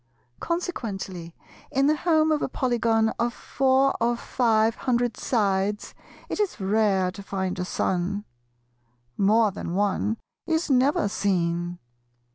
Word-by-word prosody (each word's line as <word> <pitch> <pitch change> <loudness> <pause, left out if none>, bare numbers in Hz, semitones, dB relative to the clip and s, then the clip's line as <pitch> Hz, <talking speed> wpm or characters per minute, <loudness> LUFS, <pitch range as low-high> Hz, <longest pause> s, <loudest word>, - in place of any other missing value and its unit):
Consequently 195 - -4 0.3
in 270 +1 +2
the 300 +2 +4
home 315 -1 +2
of 305 - +1
a - - -1
Polygon 230 -3 +1
of 235 +1 0
four 270 0 +2
or 235 +1 +2
five 225 -2 +2
hundred 240 -2 0
sides 205 -3 0 0.3
it - - -4
is 410 - -1
rare 195 -2 +2
to 200 - -10
find 190 -2 -3
a 180 - -1
son; 190 +3 -1 0.9
more 215 +2 +3
than 180 -2 -5
one 205 +2 0 0.3
is 320 -2 0
never 275 - +3
seen. 175 -3 -1
220 Hz, 125 wpm, -25 LUFS, 195-260 Hz, 0.9 s, the